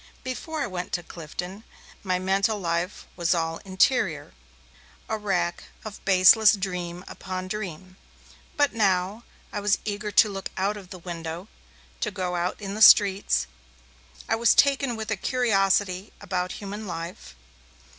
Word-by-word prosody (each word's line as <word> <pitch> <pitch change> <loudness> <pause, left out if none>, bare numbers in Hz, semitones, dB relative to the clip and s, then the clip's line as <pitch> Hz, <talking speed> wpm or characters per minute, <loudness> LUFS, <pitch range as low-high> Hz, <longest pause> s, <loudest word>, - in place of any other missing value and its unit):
Before 300 +5 -4
I - - +1
went 180 -2 -5
to 175 - -1
Clifton, 180 +5 -7 0.4
my 185 -2 0
mental 195 +3 +1
life 170 +1 -2
was 175 0 +1
all 165 -1 -1
interior, 190 -1 +1 0.7
a 220 - -1
rack 185 -5 -1 0.2
of 215 -1 -8
baseless 195 +3 +7
dream 180 -3 -4
upon 185 -1 -6
dream. 185 -2 -6 0.6
But, 290 -1 +3
now, 200 0 +1 0.3
I 210 - -2
was 205 -1 +2
eager 210 0 -3
to 210 - +5
look 195 -2 -5
out 195 +2 0
of 195 -3 -11
the 185 - -8
window, 170 +2 -6 0.5
to 215 - -1
go 180 -3 -3
out 175 +1 -2
in 200 -2 -5
the 215 - -5
streets; 195 - +6 0.8
I - - +2
was 230 0 +4
taken 275 -3 +3
with 220 -1 -5
a - - +2
curiosity 195 -4 +1
about 180 -1 -3
human 205 +1 -7
life. 165 - -7
195 Hz, 145 wpm, -25 LUFS, 180-210 Hz, 0.8 s, baseless